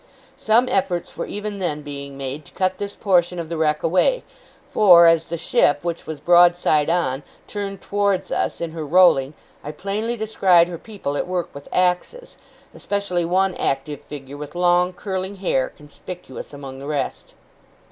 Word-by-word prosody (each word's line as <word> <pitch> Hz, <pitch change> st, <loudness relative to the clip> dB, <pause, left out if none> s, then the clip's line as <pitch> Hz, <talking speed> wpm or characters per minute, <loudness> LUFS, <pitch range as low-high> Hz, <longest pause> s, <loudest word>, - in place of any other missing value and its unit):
Some 240 Hz, -1 st, +3 dB
efforts 185 Hz, -6 st, -1 dB
were -, -, -4 dB
even 205 Hz, 0 st, -5 dB
then 150 Hz, -5 st, -2 dB
being 140 Hz, -1 st, -7 dB
made, 135 Hz, +2 st, -5 dB
to -, -, -16 dB
cut 185 Hz, 0 st, -1 dB
this 200 Hz, 0 st, -5 dB
portion 180 Hz, -3 st, +2 dB
of 165 Hz, -2 st, -5 dB
the 170 Hz, -, -3 dB
wreck 150 Hz, -1 st, +1 dB
away; 340 Hz, -, +2 dB, 0.5 s
for, 175 Hz, -5 st, +7 dB
as 165 Hz, -1 st, +4 dB
the 170 Hz, -, -4 dB
ship, 165 Hz, -4 st, +2 dB
which 170 Hz, -1 st, -4 dB
was 155 Hz, -2 st, -5 dB
broadside 175 Hz, -2 st, +4 dB
on, 155 Hz, -6 st, 0 dB, 0.2 s
turned 200 Hz, -2 st, -5 dB
towards 200 Hz, -2 st, 0 dB
us -, -, -1 dB
in 170 Hz, -1 st, -3 dB
her 160 Hz, -1 st, -5 dB
rolling, 150 Hz, -3 st, +4 dB, 0.3 s
I -, -, -6 dB
plainly 205 Hz, +8 st, -3 dB
descried 190 Hz, -6 st, +4 dB
her 170 Hz, -2 st, -6 dB
people 195 Hz, -10 st, -5 dB
at -, -, -2 dB
work 180 Hz, -1 st, -3 dB
with 140 Hz, 0 st, -11 dB
axes, 185 Hz, -, -1 dB, 0.4 s
especially 200 Hz, -4 st, -2 dB
one 185 Hz, +2 st, +1 dB
active 140 Hz, -1 st, -2 dB
figure 140 Hz, -1 st, -9 dB
with 150 Hz, +3 st, -8 dB
long 180 Hz, 0 st, +3 dB
curling 190 Hz, +1 st, -4 dB
hair, 180 Hz, -9 st, 0 dB
conspicuous 150 Hz, 0 st, -10 dB
among 135 Hz, -2 st, -9 dB
the 140 Hz, -, -8 dB
rest. 150 Hz, -2 st, -4 dB
175 Hz, 165 wpm, -22 LUFS, 150-195 Hz, 0.5 s, for